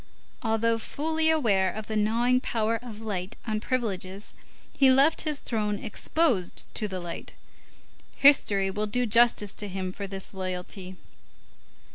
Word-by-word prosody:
Although 225 0 +1
fully 315 +6 0
aware 205 -12 +2
of 215 +2 -6
the 220 - -4
gnawing 235 +4 +2
power 225 -1 -1
of 225 -3 -9
light 195 -4 -4
on 215 -2 -1
privileges, 205 -5 -3 0.4
he 270 -1 +5
left 275 +5 +5
his 300 - -1
throne 210 -5 -2
exposed 225 - 0
to 215 - +1
the 190 -2 -5
light. 175 -1 -7 0.8
History 205 -9 +5
will 210 +2 -2
do 245 +4 0
justice 230 -3 +3
to 210 - -5
him 185 -1 -4
for 200 0 -6
this 195 0 -6
loyalty. 185 0 -5
215 Hz, 140 wpm, -27 LUFS, 195-245 Hz, 0.8 s, he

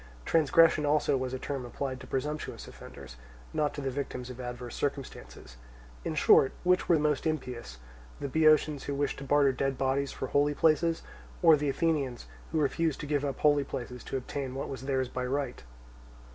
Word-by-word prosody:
Transgression 160 0 +4
also 150 -1 +2
was 130 -1 -2
a 130 - -3
term 135 0 -4
applied 130 +1 -4
to 130 - -11
presumptuous 150 +4 -4
offenders, 65 -3 -11 0.4
not 150 -1 +1
to 145 - -4
the 135 -1 -2
victims 130 -2 -5
of 125 0 -8
adverse 125 -1 -6
circumstances. 135 - -5 0.5
In - - -3
short, 135 - +5
which 180 0 +2
were 170 - +6
most 150 0 +1
impious—the - - -6
Boeotians 155 0 +3
who 140 - -2
wished 145 0 -1
to - - -7
barter 140 0 +4
dead 135 +1 -1
bodies 135 +1 0
for - - -4
holy 145 +1 +2
places, 165 +2 +2 0.4
or 165 -2 +8
the 145 -1 -1
Athenians 140 - -1 0.3
who 160 - +1
refused 155 +2 0
to - - -5
give 145 -1 0
up 140 -2 -2
holy 145 -1 +4
places 125 -2 -6
to - - -2
obtain 130 0 -5
what 135 - -4
was 135 - -6
theirs 130 -2 0
by 125 +1 -4
right? 130 0 -2
140 Hz, 180 wpm, -29 LUFS, 130-150 Hz, 0.5 s, or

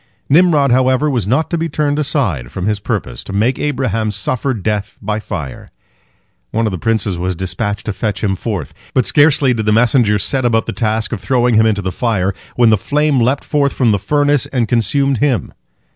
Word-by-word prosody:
Nimrod, 150 -4 +4
however, 130 +3 +2
was 120 -7 -1
not 135 +8 0
to 170 - 0
be 165 0 -2
turned 145 0 -1
aside 105 - -1
from 95 - -4
his 105 0 0
purpose, 65 -10 -4
to - - -9
make 115 +6 +1
Abraham 125 -7 -1
suffer 110 +6 -1
death 105 -2 -3
by 105 +1 -3
fire. 75 -10 -7 0.8
One 115 +1 -1
of 110 - 0
the 90 - -4
princes 105 -4 -1
was 90 +1 -2
dispatched 95 +3 -3
to 110 - -2
fetch 105 +1 -3
him 100 -2 +1
forth. 95 - -4 0.2
But 130 - +3
scarcely 145 -3 +3
did 110 -2 -3
the - - +4
messenger 115 -1 +3
set 130 +6 0
about 115 -2 +1
the - - -4
task 110 -1 -1
of - - -4
throwing 125 -2 +1
him 110 0 +4
into 100 -3 0
the 95 - -2
fire, 100 -4 -1 0.2
when 120 -2 +4
the 110 - +4
flame 150 +3 +1
leapt 130 +4 +1
forth 140 -2 0
from 120 -4 +2
the 100 - +1
furnace 145 +4 +1
and 125 -4 -1
consumed 130 +3 +1
him. 125 - 0
115 Hz, 205 wpm, -16 LUFS, 105-135 Hz, 0.8 s, Nimrod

